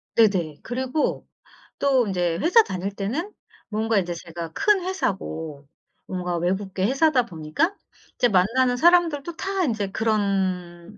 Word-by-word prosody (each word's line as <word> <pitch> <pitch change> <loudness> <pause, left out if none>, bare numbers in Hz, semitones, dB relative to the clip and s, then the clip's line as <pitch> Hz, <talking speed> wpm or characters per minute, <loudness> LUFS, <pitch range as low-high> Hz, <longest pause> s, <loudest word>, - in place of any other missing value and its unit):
네네. 180 -9 +2
그리고 260 +4 -2 0.5
또 265 -5 +3
인제 175 -3 0
회사 445 +7 +6
다닐 195 - -4
때는 290 - -3 0.4
뭔가 220 0 0
인제 175 -1 -3
제가 170 -1 -7
큰 405 - +3
회사고 160 - -3 0.4
뭔가 180 -2 -3
외국계 190 +2 -1
회사다 270 0 +3
보니까 175 - -1 0.4
이제 245 - +4
만나는 245 +7 +2
사람들도 340 -1 +3
다 385 -1 -1
인제 220 -6 -1
그런 195 -4 -1
210 Hz, 270 characters per minute, -24 LUFS, 180-275 Hz, 0.5 s, 회사